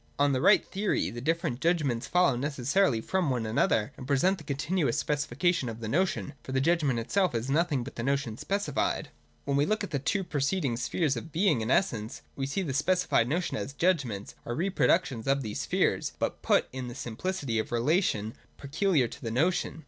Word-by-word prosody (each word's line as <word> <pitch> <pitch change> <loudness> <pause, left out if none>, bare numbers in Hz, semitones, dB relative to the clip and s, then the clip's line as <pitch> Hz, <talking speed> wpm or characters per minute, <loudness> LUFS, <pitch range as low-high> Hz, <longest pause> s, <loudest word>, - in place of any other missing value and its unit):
On 145 0 +3
the 130 - 0
right 205 - +5
theory, 195 - -1
the 120 +2 -7
different 160 -3 -1
judg 170 0 +2
ments 120 -4 -2
follow 180 -6 +3
necessarily 135 - +1
from 185 +3 0
one 125 -4 -1
another, 110 -1 +1
and 130 - -8
present 180 +8 +2
the - - -11
continuous 145 0 -1
specification 150 0 0
of 115 0 -7
the 110 - -5
notion; 160 - 0
for 130 - -7
the 130 - +2
judg 165 +5 +2
ment 135 -5 +1
itself 175 - 0
is 115 +4 -2
nothing 150 -4 +1
but 140 - -10
the - - -2
notion 135 -3 -1
specified. 195 - -1 0.4
When 140 - 0
we 145 +2 +2
look 215 0 0
at 200 - -5
the 140 - 0
two 195 +8 0
preceding 145 -3 -1
spheres 135 +5 0
of 120 +7 -7
Being 170 - +2
and 110 - -3
Essence, 115 - 0
we 135 -1 -2
see 190 +8 -2
that - - -5
the - - -1
specified 155 -4 +2
notions 165 - -1
as 120 +7 -6
judg 170 0 +2
ments 105 -5 -6
are 120 - -4
reproductions 165 - +1
of 135 0 +2
these 105 -2 -4
spheres, - - 0
but - - -2
put - - +2
in 130 -1 -5
the 120 - -7
simplicity 125 -1 -3
of 110 - -3
relation 120 - +1 0.2
peculiar 145 - +1
to - - -11
the 115 - -3
notion. 160 +7 0
140 Hz, 210 wpm, -28 LUFS, 120-175 Hz, 0.4 s, right